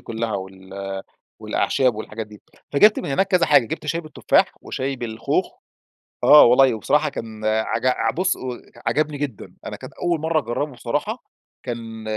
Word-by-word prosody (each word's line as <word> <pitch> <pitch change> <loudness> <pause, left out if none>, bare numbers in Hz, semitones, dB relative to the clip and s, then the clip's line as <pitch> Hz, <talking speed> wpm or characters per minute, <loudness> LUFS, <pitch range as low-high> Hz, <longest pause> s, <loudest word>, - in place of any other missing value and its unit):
كلّها 115 -1 -4
وال 95 0 -6 0.4
والأعشاب 130 -4 +1
والحاجات 110 0 -6
دي، 105 -1 -15 0.3
فجبت 210 +9 +6
من - - -4
هناك 190 +8 +2
كذا 180 -3 +3
حاجة 145 -4 +5
جبت 150 - -5
شاي 165 +3 -1
بالتفاح 155 -4 +1
وشاي 135 +1 -3
بالخوخ. 115 -2 -2 0.7
آه، 150 - +9
والله 125 +1 +6
وبصراحة 150 +8 +1
كان 110 -5 -7
عج 110 +3 0
ع 115 -3 +2
بص 185 +5 0
و 125 -2 -5 0.3
عجبني 155 -1 0
جدًا. 140 -7 -5
أنا - - -5
كانت - - -11
أول 170 -2 -1
مرة 160 0 +1
أجربه 145 +2 -3
بصراحة 145 - -3 0.4
كان 115 -2 -6
125 Hz, 160 wpm, -22 LUFS, 110-150 Hz, 0.7 s, آه